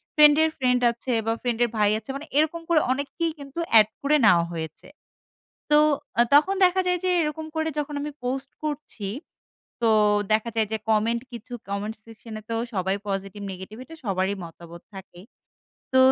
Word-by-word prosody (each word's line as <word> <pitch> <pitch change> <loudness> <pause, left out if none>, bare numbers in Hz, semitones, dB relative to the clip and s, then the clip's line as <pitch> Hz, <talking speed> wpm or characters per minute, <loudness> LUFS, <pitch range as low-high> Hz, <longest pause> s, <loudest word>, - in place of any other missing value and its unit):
Friend 300 -1 +8
এর 320 - +3
friend 250 -2 +2
আছে 235 +2 -5
বা 225 - +1
ফ্রেন্ড 240 -2 -1
এর 240 - +1
ভাই 210 -1 +4
আছে। 220 - -20
মানে 280 - -6
এরকম 315 +2 +2
করে 335 -2 +5
অনেককেই 285 +5 -1
কিন্তু 280 +4 -8 0.2
এড 210 - +5
করে 290 +2 +3
নেওয়া 170 -5 +5
হয়েছে। 160 -1 -7 0.8
তো 295 - +7 0.4
আ - - +8
তখন 380 +7 +5
দেখা 370 +1 +3
যায় 360 - +2
যে 370 - +1
এরকম 315 +1 -3
করে 315 0 0
যখন 295 0 -4
আমি 295 0 -4
পোস্ট 265 +2 -3
করছি, 295 -9 -5 0.7
তো 230 - +3 0.4
দেখা 220 +2 +2
যায় 220 -2 +2
যে 220 - 0
কমেন্ট 225 +2 +2
কিছু 240 +1 -9 0.2
কমেন্ট 205 +2 -3
সেকশন 225 0 -12
এ - - -13
তো 230 - -1 0.2
সবাই 190 0 0
পজিটিভ 195 0 -4
নেগেটিভ 190 +4 -9
এটা 325 +4 -12
সবারই 190 0 0
মতাবত 170 0 -11
থাকে। 190 -2 -11 0.7
তো 260 - +4
235 Hz, 180 wpm, -25 LUFS, 205-295 Hz, 0.8 s, ফ্রেন্ড